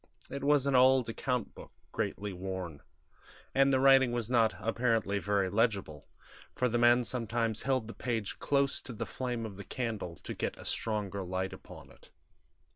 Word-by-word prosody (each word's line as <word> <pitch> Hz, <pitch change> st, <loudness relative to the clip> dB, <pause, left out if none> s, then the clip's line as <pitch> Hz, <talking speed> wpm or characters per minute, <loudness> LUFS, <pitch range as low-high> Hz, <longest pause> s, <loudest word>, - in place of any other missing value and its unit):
It 140 Hz, 0 st, -5 dB
was 145 Hz, -1 st, +3 dB
an 140 Hz, -, +1 dB
old 130 Hz, -1 st, +5 dB
account 125 Hz, 0 st, -2 dB
book, -, -, -12 dB, 0.2 s
greatly 100 Hz, -1 st, -3 dB
worn; 90 Hz, -4 st, -5 dB, 0.7 s
and 135 Hz, 0 st, +4 dB
the 130 Hz, -, +3 dB
writing 135 Hz, -2 st, +6 dB
was 120 Hz, -1 st, -2 dB
not, 115 Hz, -3 st, +3 dB
apparently, 115 Hz, -3 st, 0 dB
very 100 Hz, -1 st, +1 dB
legible, 100 Hz, -, -1 dB, 0.5 s
for 125 Hz, -, +1 dB
the 120 Hz, 0 st, 0 dB
man 120 Hz, +1 st, +5 dB
sometimes 115 Hz, -2 st, -1 dB
held 130 Hz, -4 st, 0 dB
the 115 Hz, -, -8 dB
page 115 Hz, -5 st, -3 dB
close 140 Hz, -1 st, +1 dB
to 125 Hz, -, -8 dB
the 115 Hz, +1 st, -4 dB
flame 120 Hz, 0 st, -3 dB
of 100 Hz, -3 st, -8 dB
the 100 Hz, -, -7 dB
candle 110 Hz, -9 st, -4 dB
to -, -, -7 dB
get -, -, -3 dB
a -, -, -11 dB
stronger 105 Hz, -3 st, -1 dB
light 95 Hz, +1 st, -3 dB
upon -, -, -12 dB
it. -, -, -19 dB
115 Hz, 175 wpm, -31 LUFS, 100-125 Hz, 0.7 s, writing